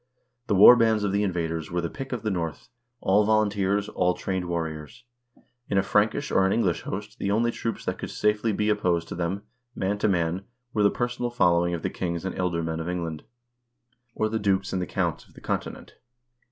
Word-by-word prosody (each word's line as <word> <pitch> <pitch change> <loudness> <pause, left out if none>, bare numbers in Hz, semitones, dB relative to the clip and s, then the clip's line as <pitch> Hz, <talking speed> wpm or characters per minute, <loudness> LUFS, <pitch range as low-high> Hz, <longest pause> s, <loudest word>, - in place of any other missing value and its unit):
The 105 - +2
war 105 +6 +10
bands 110 -3 +3
of 100 - 0
the 100 +1 +1
invaders 80 -5 -2
were 90 - -1
the 85 - -1
pick 135 +8 -7
of 120 -4 -3
the 110 - 0
North, 85 -5 -4 0.3
all 100 +2 +4
volunteers, 105 -1 +1
all 90 0 +1
trained 95 -1 -3
warriors. 85 +6 -4 0.7
In 100 - +1
a 95 - +4
Frankish 105 +7 +1
or 95 - +4
an 95 - +2
English 95 -8 +1
host - - -6
the 100 - -1
only 115 +3 +2
troops 115 -1 -4
that - - -2
could - - -5
safely 105 +1 +1
be 105 +1 0
opposed 90 -5 +1
to - - -5
them, 90 +4 -2 0.3
man 100 +2 -1
to 105 - +2
man, 90 -1 0 0.3
were 105 - +1
the 100 - +6
personal 120 +1 -2
following 85 -6 +2
of 85 - -7
the - - -1
kings 85 -1 -3
and 95 - -3
ealdormen 85 -3 -1
of 80 +2 -4
England 85 -3 -4 0.5
— 120 0 -46
or 110 - +1
the 110 +1 -2
dukes 100 -2 0
and 90 -2 -2
counts - - -2
of - - -24
the - - -12
Continent. - - -4
95 Hz, 205 wpm, -26 LUFS, 85-110 Hz, 0.7 s, war